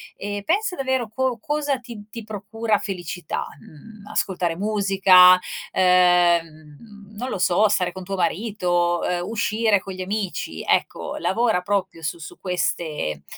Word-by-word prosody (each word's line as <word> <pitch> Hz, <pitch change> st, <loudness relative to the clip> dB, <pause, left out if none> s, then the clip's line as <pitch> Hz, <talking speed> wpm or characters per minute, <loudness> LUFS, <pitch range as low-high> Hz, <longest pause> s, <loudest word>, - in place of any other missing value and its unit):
e 205 Hz, 0 st, -5 dB
pensa 380 Hz, +2 st, 0 dB
davvero 260 Hz, -4 st, -1 dB
co 255 Hz, 0 st, -1 dB
cosa 295 Hz, -2 st, -1 dB
ti 225 Hz, -4 st, -11 dB
ti 230 Hz, -1 st, -8 dB
procura 215 Hz, +1 st, -2 dB
felicità? 180 Hz, -5 st, -5 dB
Mhmm, 205 Hz, +7 st, -15 dB
ascoltare 175 Hz, -3 st, -1 dB
musica, 195 Hz, -2 st, +6 dB, 0.4 s
ehm, 180 Hz, -2 st, +4 dB, 0.3 s
mhmm, 210 Hz, -2 st, -15 dB
non 250 Hz, +3 st, -4 dB
lo -, -, -3 dB
so, 180 Hz, +4 st, +3 dB
stare 180 Hz, -3 st, +1 dB
con 185 Hz, +1 st, -8 dB
tuo 195 Hz, -, -3 dB
marito, 175 Hz, -2 st, 0 dB
ehm, 175 Hz, 0 st, -1 dB
uscire 220 Hz, -1 st, +1 dB
con 195 Hz, -, -7 dB
gli 185 Hz, -, -7 dB
amici. 200 Hz, 0 st, -4 dB
Ecco, -, -, 0 dB
lavora 225 Hz, -6 st, +1 dB
proprio 190 Hz, -3 st, -2 dB
su 150 Hz, +3 st, -3 dB
su 160 Hz, -, -10 dB
queste, 155 Hz, -, -2 dB
195 Hz, 145 wpm, -23 LUFS, 180-220 Hz, 0.4 s, musica